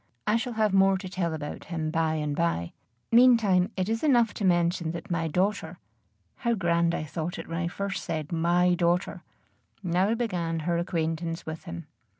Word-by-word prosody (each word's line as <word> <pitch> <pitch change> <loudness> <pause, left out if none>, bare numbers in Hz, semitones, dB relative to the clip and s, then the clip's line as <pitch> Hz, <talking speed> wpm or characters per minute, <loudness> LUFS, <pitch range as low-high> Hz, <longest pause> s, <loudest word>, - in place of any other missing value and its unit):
I 215 - +2
shall 240 +1 -1
have 215 -2 +1
more 195 0 +5
to 190 0 -7
tell 180 -2 -2
about 150 -2 -6
him 160 -2 -3
by 160 -1 +1
and 150 -2 -2
by. 150 - -1 0.4
Meantime 230 -7 +5
it 185 0 0
is 225 +4 -1
enough 240 -7 +4
to - - -5
mention 175 -2 +1
that 180 +3 -7
my 165 -1 0
daughter 190 +6 -1 0.6
how 235 -2 0
grand 170 -3 +1
I - - -3
thought 160 +3 -4
it - - -7
when 165 0 -3
I 175 - -1
first 200 +3 -4
said 155 -1 -4
my 175 +2 +3
daughter! 175 +1 0 0.6
now 185 +5 +1
began 175 -8 -2
her 170 +2 0
acquaintance 165 -1 -2
with 160 0 -7
him. 85 0 -7
175 Hz, 180 wpm, -27 LUFS, 165-195 Hz, 0.6 s, more